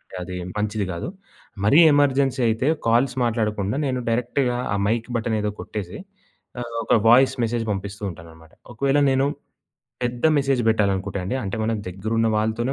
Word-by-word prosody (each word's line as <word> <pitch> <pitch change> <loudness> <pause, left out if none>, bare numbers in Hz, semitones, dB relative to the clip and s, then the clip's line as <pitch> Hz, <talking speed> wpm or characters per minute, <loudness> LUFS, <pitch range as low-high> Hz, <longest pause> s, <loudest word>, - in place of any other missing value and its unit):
అంటే 95 - -13
అది 90 0 -7 0.2
మంచిది 105 0 -1
కాదు. 85 - -5 0.6
మరీ 140 +10 +5
ఎమర్జెన్సీ 135 -2 +2
అయితే, 115 +4 0 0.2
కాల్స్ 120 +3 +3
మాట్లాడకుండా, 105 -2 -1
నేను 130 -1 -1
డైరెక్ట్‌గా 125 +2 0 0.2
ఆ - - +1
మైక్ 115 +2 -1
బటనేదో 110 -2 -1
కొట్టేసి, 100 -3 -6 0.6
ఆహ్, 120 -1 -6
ఒక - - +2
వాయిస్ 130 +3 +6
మెసేజ్ 115 0 -1
పంపిస్తూ 100 +1 -6
ఉంటాననమాట. 80 -1 -14 0.2
ఒకవేళ 140 +4 +1
నేను 135 +1 +2 0.8
పెద్ద 120 +3 -3
మెసేజ్ 135 -2 +1
పెట్టాలనుకుంటే 100 -3 0
అండి, 125 +8 -2
అంటే 100 +3 -3
మన 115 - 0 0.2
దగ్గరున్న 110 +5 -1
వాళ్ళతోనే 110 +4 0
115 Hz, 145 wpm, -23 LUFS, 105-125 Hz, 0.8 s, వాయిస్